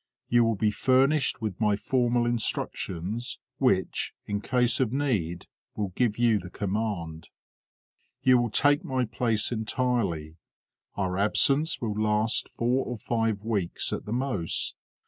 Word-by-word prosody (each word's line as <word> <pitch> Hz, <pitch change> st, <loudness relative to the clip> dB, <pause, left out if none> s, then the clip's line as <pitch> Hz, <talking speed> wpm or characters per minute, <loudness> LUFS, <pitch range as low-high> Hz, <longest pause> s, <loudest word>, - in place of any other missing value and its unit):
You 120 Hz, 0 st, +5 dB
will 115 Hz, -1 st, +2 dB
be 105 Hz, +1 st, +1 dB
furnished 135 Hz, +3 st, +2 dB
with 105 Hz, -2 st, -3 dB
my 105 Hz, -1 st, +3 dB
formal 120 Hz, +1 st, +1 dB
instructions, 110 Hz, -2 st, -2 dB, 0.2 s
which, -, -, +1 dB
in 100 Hz, 0 st, -2 dB
case 125 Hz, 0 st, +2 dB
of 125 Hz, -4 st, +1 dB
need, 105 Hz, -, -1 dB, 0.3 s
will 105 Hz, -2 st, -2 dB
give 110 Hz, +3 st, 0 dB
you 115 Hz, -3 st, +3 dB
the 90 Hz, -, -9 dB
command. 95 Hz, -5 st, -3 dB, 0.9 s
You 130 Hz, -1 st, +6 dB
will 120 Hz, -1 st, 0 dB
take 145 Hz, +6 st, +3 dB
my 130 Hz, -1 st, 0 dB
place 115 Hz, -1 st, -1 dB
entirely. 110 Hz, -, -1 dB, 0.6 s
Our 95 Hz, -1 st, -1 dB
absence 140 Hz, +9 st, +2 dB
will 110 Hz, -3 st, -1 dB
last 110 Hz, +1 st, +1 dB
four 125 Hz, +3 st, 0 dB
or 125 Hz, -, -5 dB
five 115 Hz, -2 st, -1 dB
weeks 105 Hz, -6 st, -1 dB
at -, -, -4 dB
the 105 Hz, -, -6 dB
most. 120 Hz, -9 st, -1 dB
115 Hz, 140 wpm, -27 LUFS, 100-125 Hz, 0.9 s, You